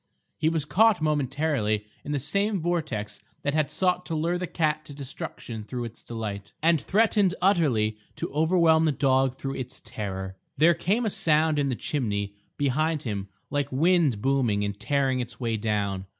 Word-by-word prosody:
He 155 Hz, -, +1 dB
was 160 Hz, -3 st, -1 dB
caught 215 Hz, +5 st, +4 dB
momentarily 145 Hz, -7 st, 0 dB, 0.2 s
in 145 Hz, -, -5 dB
the 145 Hz, -, +1 dB
same 200 Hz, -, 0 dB
vortex 150 Hz, -12 st, -2 dB, 0.2 s
that 140 Hz, -, 0 dB
had 155 Hz, -2 st, +1 dB
sought 180 Hz, -1 st, +1 dB
to 165 Hz, -, -2 dB
lure 170 Hz, +3 st, 0 dB
the 180 Hz, -, -3 dB
cat 155 Hz, -2 st, 0 dB
to 145 Hz, -, -10 dB
destruction 135 Hz, -5 st, -7 dB
through 120 Hz, +3 st, -5 dB
its 115 Hz, -1 st, -8 dB
delight, 105 Hz, -4 st, -6 dB
and 165 Hz, -2 st, +4 dB
threatened 205 Hz, -3 st, +3 dB
utterly 135 Hz, -, +2 dB, 0.2 s
to -, -, -4 dB
overwhelm 160 Hz, +1 st, +4 dB
the 155 Hz, -, +3 dB
dog 135 Hz, -1 st, +2 dB
through 135 Hz, 0 st, -4 dB
its 130 Hz, -1 st, -6 dB
terror. 95 Hz, -2 st, -5 dB, 0.2 s
There 165 Hz, +3 st, +6 dB
came 200 Hz, +8 st, 0 dB
a 215 Hz, -, 0 dB
sound 155 Hz, -2 st, +2 dB
in 140 Hz, -1 st, +1 dB
the 130 Hz, -, 0 dB
chimney 100 Hz, -8 st, -2 dB, 0.2 s
behind 150 Hz, +3 st, +1 dB
him 100 Hz, -4 st, -3 dB, 0.2 s
like 145 Hz, -1 st, -1 dB
wind 150 Hz, -, +3 dB
booming 125 Hz, -7 st, +2 dB
and 100 Hz, 0 st, -4 dB
tearing 135 Hz, -2 st, +1 dB
its 120 Hz, -2 st, -5 dB
way 115 Hz, -3 st, -1 dB
down. 100 Hz, -3 st, -1 dB
145 Hz, 175 wpm, -26 LUFS, 115-165 Hz, 0.2 s, There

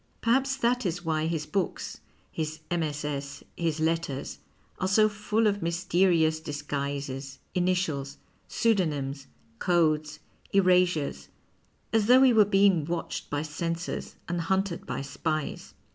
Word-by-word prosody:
Perhaps 270 Hz, +4 st, +2 dB
that 245 Hz, -1 st, +1 dB
is 175 Hz, -2 st, -3 dB
why 160 Hz, -1 st, 0 dB
his 160 Hz, -2 st, -2 dB
books, 185 Hz, +4 st, -3 dB, 0.3 s
his 155 Hz, 0 st, -4 dB
MSS., 150 Hz, -4 st, -3 dB
his 165 Hz, -2 st, -1 dB
letters, 160 Hz, -4 st, -1 dB, 0.4 s
are 190 Hz, -, 0 dB
so 215 Hz, +3 st, +5 dB
full 210 Hz, +1 st, 0 dB
of 205 Hz, -1 st, +1 dB
mysterious 170 Hz, -1 st, +2 dB
disguises, 140 Hz, -2 st, -4 dB, 0.2 s
initials, 175 Hz, -7 st, 0 dB, 0.3 s
pseudo 220 Hz, -5 st, +2 dB
nyms, 140 Hz, -2 st, -4 dB, 0.3 s
codes, 155 Hz, -3 st, +2 dB, 0.4 s
erasures, 180 Hz, -, +3 dB, 0.7 s
as 220 Hz, -2 st, +3 dB
thougii 255 Hz, +2 st, +7 dB
he 255 Hz, -, +6 dB
were 215 Hz, -2 st, +6 dB
being 195 Hz, -4 st, +4 dB
watched 170 Hz, +1 st, -4 dB
by 145 Hz, +1 st, -1 dB
censors 165 Hz, +2 st, -4 dB
and 175 Hz, 0 st, -1 dB
hunted 190 Hz, +1 st, -1 dB
by -, -, -3 dB
spies. 155 Hz, +2 st, -3 dB
165 Hz, 125 wpm, -28 LUFS, 150-190 Hz, 0.7 s, thougii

